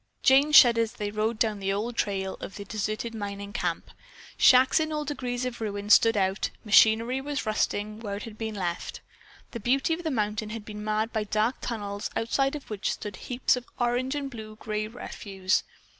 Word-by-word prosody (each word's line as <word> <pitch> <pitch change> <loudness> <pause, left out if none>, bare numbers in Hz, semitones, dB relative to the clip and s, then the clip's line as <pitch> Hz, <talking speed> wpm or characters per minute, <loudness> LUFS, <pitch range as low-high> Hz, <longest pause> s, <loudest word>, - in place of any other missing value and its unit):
Jane 275 +3 +5
shuddered 240 -5 +8
as 225 -1 -2
they 205 -1 -4
rode 215 +2 -1
down 215 -2 0
the 195 0 -1
old 220 +4 -2
trail 190 -3 -1
of - - -8
the 200 0 -7
deserted 215 +3 -3
mining 200 -1 -6
camp. 240 - -3 0.4
Shacks 260 +2 +6
in 315 0 -1
all 300 -1 -2
degrees 255 -4 -3
of 245 -2 -5
ruin 205 -1 -3
stood 225 0 +6
about, 190 0 0 0.2
machinery 225 +4 +5
was 285 0 -3
rusting 215 0 -1
where 205 -3 -4
it 205 - -6
had 225 -2 -8
been 220 -1 -4
left. 175 -3 -4 0.5
The 235 - -5
beauty 270 +8 +1
of 345 +2 -4
the 320 - -1
mountain 215 -4 -1
had 215 -1 -6
been 210 -1 -7
marred 215 +2 -1
by 220 -2 -1
dark 215 +4 0
tunnels, 205 -3 -4
outside 270 +5 0
of 290 - -8
which 205 -2 -1
stood 205 -2 -7
heaps 250 +5 0
of 250 -1 -7
orange 245 +3 0
and 280 -2 -4
blue 215 -2 -9
gray 215 0 -3
refuse. 195 -4 -2
220 Hz, 195 wpm, -27 LUFS, 210-245 Hz, 0.5 s, shuddered